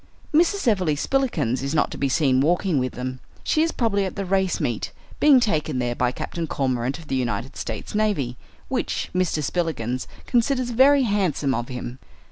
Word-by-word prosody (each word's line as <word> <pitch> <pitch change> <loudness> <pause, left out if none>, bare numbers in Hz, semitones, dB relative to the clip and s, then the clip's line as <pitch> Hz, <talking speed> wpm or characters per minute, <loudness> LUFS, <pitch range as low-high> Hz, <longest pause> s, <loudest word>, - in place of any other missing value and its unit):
Mrs. 345 +1 +3
Everleigh 185 -9 +2
Spillikins 150 - 0
is 140 +3 -2
not 155 - +2
to - - -6
be 140 - +1
seen 130 -2 +3
walking 175 +1 +2
with 130 0 -2
them. 130 +1 -5 0.2
She 310 - +2
is 325 +1 +2
probably 210 -5 +1
at 190 - -4
the 200 - -3
race 190 0 +1
meet, - - -2 0.3
being 285 -3 +7
taken 155 - 0
there 120 -1 0
by 125 0 +1
Captain 165 +5 -4
Cormorant 130 -2 -1
of 165 -2 -13
the - - -4
United 125 -1 -2
States - - -5
navy, 205 - 0 0.3
which - - -2
Mr. 180 -4 0
Spillikins 135 -7 -2 0.2
considers 250 0 +1
very 270 +3 +5
handsome 185 - +1
of 120 -1 -2
him. 125 0 -6
160 Hz, 180 wpm, -23 LUFS, 130-215 Hz, 0.3 s, being